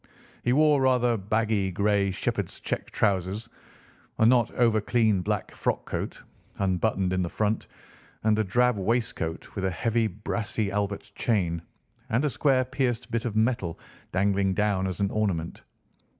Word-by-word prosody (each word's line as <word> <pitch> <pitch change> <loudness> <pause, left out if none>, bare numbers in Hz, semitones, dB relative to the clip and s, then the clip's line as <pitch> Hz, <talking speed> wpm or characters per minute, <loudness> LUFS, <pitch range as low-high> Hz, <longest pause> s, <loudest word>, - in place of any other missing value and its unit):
He 120 - +2
wore 150 +1 +4
rather 125 -2 +3
baggy 105 -1 0
grey 100 +1 +2
shepherd's 95 - -3
check - - -3
trousers, 100 +1 0 0.7
a 110 - +4
not 120 0 +5
over 115 -3 +3
clean 110 -3 +2
black - - -2
frock - - -1
coat, - - -4 0.3
unbuttoned 95 0 +1
in 95 - +1
the 85 - -1
front, 105 +3 -1 0.6
and 110 0 +3
a - - +3
drab 120 +4 +2
waistcoat 110 -6 -2
with 95 - -4
a 95 - +2
heavy 115 +5 +1
brassy 105 +1 -2
Albert 100 0 -2
chain, 90 -9 0 0.5
and 120 +5 +1
a 145 - +1
square 130 -3 +2
pierced 125 -2 -2
bit 115 +1 -1
of 110 -3 -2
metal 110 -6 0 0.3
dangling 95 0 +1
down 100 -2 +1
as 95 - -4
an 100 - +1
ornament. 95 -7 -1
105 Hz, 150 wpm, -27 LUFS, 95-115 Hz, 0.7 s, not